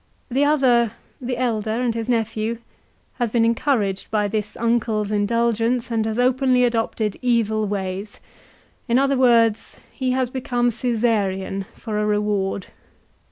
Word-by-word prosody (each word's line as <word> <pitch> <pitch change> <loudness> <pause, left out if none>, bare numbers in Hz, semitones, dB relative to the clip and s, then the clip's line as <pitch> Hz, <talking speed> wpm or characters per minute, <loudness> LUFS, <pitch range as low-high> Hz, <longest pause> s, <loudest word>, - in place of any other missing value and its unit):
The 270 +4 +2
other, 255 -6 +3 0.3
the 250 0 -3
elder 225 -4 -1
and 245 -2 0
his 230 +1 -4
nephew, 225 -1 -1 0.6
has 240 -2 +1
been 230 +1 +2
encouraged 230 -5 0
by 210 -2 +1
this 210 0 -3
uncle's 225 -3 0
indulgence, 230 +3 0
and 225 -1 +1
has 220 0 -2
openly 255 0 +3
adopted 225 -3 0
evil 220 -4 +1
ways. 195 0 -4 0.7
In 235 0 +3
other 275 +1 +2
words, 230 -4 +3
he 260 -2 -2
has 255 -1 0
become 245 -2 0
Caesarian, 205 -5 -1
for 215 -2 -4
a 210 - 0
reward. 205 -2 0
230 Hz, 135 wpm, -22 LUFS, 210-245 Hz, 0.7 s, other